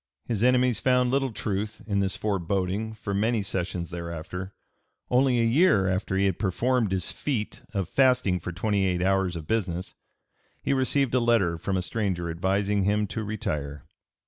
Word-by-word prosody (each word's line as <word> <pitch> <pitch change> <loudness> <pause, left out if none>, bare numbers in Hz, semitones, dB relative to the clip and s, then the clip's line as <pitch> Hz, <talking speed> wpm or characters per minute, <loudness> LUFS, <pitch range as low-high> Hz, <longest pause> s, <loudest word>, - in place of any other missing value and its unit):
His 110 -2 -1
enemies 125 -2 +3
found 125 -1 +2
little 135 -1 +1
truth 105 0 -3
in 100 -2 0
this 95 -1 0
foreboding 100 +2 -1
for 100 -2 -5
many 110 +2 +1
sessions 90 -2 -2
thereafter. 85 +3 -6 0.6
Only 125 -1 +3
a - - +3
year 115 - +4
after 95 +1 -1
he 100 - +3
had 95 -3 0
performed 115 +2 +1
his 95 -3 0
feat 120 -8 -3
of 95 -4 0
fasting 125 -6 +3
for 85 - -5
twenty 100 +3 0
eight 90 -2 +1
hours 95 -1 +1
of 80 -2 -6
business, 90 -3 -2 0.7
he - - +1
received 135 -1 +1
a 130 - +4
letter 115 -8 +2
from 95 +3 -1
a 90 - -1
stranger 95 -6 -2
advising 100 +4 0
him 105 +2 +2
to 110 - -3
retire. 75 -9 -4
100 Hz, 170 wpm, -26 LUFS, 90-115 Hz, 0.7 s, year